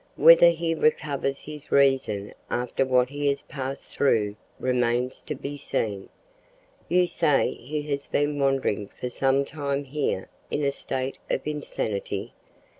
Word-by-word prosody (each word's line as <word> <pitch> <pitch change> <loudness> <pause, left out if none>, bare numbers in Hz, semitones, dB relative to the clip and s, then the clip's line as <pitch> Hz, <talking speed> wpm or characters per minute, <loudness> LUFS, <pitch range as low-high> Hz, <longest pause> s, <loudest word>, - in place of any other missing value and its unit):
Whether 165 +1 +8
he 165 0 0
recovers 145 -3 0
his 150 -1 -10
reason 130 -7 +2 0.2
after 125 +2 0
what 125 -1 +3
he 145 +1 -2
has 140 0 0
passed 135 -1 -5
through 105 -7 +1 0.2
remains 125 0 0
to 150 - -5
be 140 +2 -6
seen. 105 -7 -2 0.8
You 180 0 +4
say 160 -5 +2
he 150 +4 -5
has 140 -1 -3
been 145 0 0
wandering 135 -7 +1
for 125 - -3
some 135 +2 +2
time 140 -1 -2
here 140 -8 -2 0.2
in 150 - -1
a 140 - +2
state 130 -1 -4
of - - -1
insanity? 110 -8 -3
140 Hz, 140 wpm, -26 LUFS, 125-150 Hz, 0.8 s, Whether